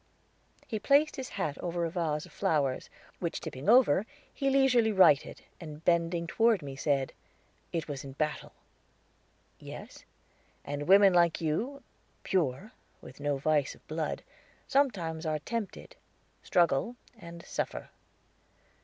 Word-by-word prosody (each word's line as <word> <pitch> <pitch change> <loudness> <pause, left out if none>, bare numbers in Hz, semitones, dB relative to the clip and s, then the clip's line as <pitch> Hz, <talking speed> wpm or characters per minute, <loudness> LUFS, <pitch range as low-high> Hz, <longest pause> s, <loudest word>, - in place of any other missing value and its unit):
He 220 - -3
placed 285 +7 +3
his 265 -3 -6
hat 155 -7 -2
over 175 -1 -2
a 165 - -3
vase 160 -4 -1
of - - -16
flowers, 140 -5 0 0.3
which 170 -2 -3
tipping 135 +9 -5
over, 225 - +5 0.3
he 275 - 0
leisurely 260 -5 +4
righted, 185 -8 +4 0.2
and 155 -1 -10
bending 170 0 +2
toward 225 0 +2
me, 135 -1 -7
said: 135 -1 0 0.6
"It 165 -3 -3
was 140 -3 -5
in 135 -1 -9
battle." 150 +2 -3 1.1
"Yes." - - -10 0.6
"And 145 +1 -4
women 195 0 +7
like 170 -2 +3
you, 225 - -2 0.4
pure, 180 - -1 0.3
with - - -13
no 145 -1 0
vice 145 0 +1
of - - -25
blood, 155 0 -3 0.4
sometimes 185 - 0
are 155 -1 0
tempted, 215 +7 -5 0.5
struggle, 175 - +2 0.2
and 170 -2 -10
suffer." - - -4
170 Hz, 130 wpm, -30 LUFS, 150-215 Hz, 1.1 s, women